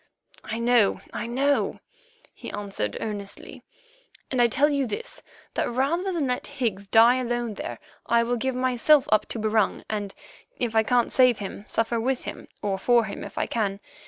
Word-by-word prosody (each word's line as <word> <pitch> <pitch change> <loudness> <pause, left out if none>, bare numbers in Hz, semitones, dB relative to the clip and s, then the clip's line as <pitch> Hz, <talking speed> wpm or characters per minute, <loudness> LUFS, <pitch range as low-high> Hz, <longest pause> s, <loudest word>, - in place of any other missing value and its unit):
"I 225 - -4
know, 235 -3 +3
I 230 - -3
know," 275 +4 +1 0.5
he - - -9
answered 195 - -3
earnestly; 205 -2 -5 0.7
"and 255 -2 +2
I 240 - +6
tell 275 +5 +3
you 280 -3 0
this, - - -5 0.3
that - - 0
rather 305 +10 0
than 335 -5 0
let 250 -1 -2
Higgs 225 -9 -3
die 230 +5 +6
alone 240 -2 -2
there, - - -6 0.3
I 235 0 +4
will 240 +1 0
give 260 +2 -1
myself 255 +3 +3
up 215 -1 +3
to - - -3
Barung, 215 -1 +1
and, 205 -2 -3 0.4
if 235 -3 -2
I 220 - +6
can't 240 +2 +2
save 250 -3 +5
him, 200 0 -7
suffer 230 +1 0
with 255 +2 -1
him, - - -7 0.2
or 195 -2 -1
for 240 +1 +4
him 200 - -6
if - - -10
I - - +1
can. 200 -4 -1
235 Hz, 180 wpm, -25 LUFS, 215-260 Hz, 0.7 s, I